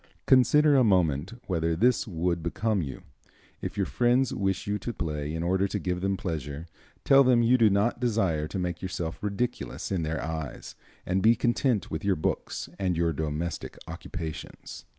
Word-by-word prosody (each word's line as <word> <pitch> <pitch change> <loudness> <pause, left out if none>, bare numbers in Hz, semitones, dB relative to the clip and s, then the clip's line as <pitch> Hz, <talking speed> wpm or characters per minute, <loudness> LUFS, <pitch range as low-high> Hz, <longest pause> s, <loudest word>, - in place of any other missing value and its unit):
Consider 145 +3 +5
a 130 - +5
moment 90 - +2
whether 80 -3 0
this 120 +7 +2
would 85 -2 -1
become 100 +5 0
you. 70 -5 -6 0.6
If - - -5
your - - +1
friends 125 +1 +2
wish 95 -2 -1
you 105 0 -1
to 120 - -4
play 75 -5 -3
in 80 - -2
order 95 +3 +1
to - - -3
give 90 -1 -2
them 95 0 0
pleasure, 80 -3 -4 0.4
tell 135 0 +7
them 125 -2 +4
you 120 +2 +5
do 115 -4 +5
not 100 +5 +1
desire 95 -11 0
to 95 - -5
make 90 -2 -3
yourself 85 -3 -4
ridiculous 105 +2 -3
in 95 -3 0
their 80 0 -2
eyes, 80 -5 -5 0.3
and 95 +1 0
be 115 +3 +5
content 120 -1 0
with 80 - -3
your 100 -1 +2
books 75 - -3
and 90 -3 0
your 85 -1 +1
domestic 80 +3 -4
occupations." 80 -2 -7
95 Hz, 175 wpm, -27 LUFS, 80-115 Hz, 0.6 s, tell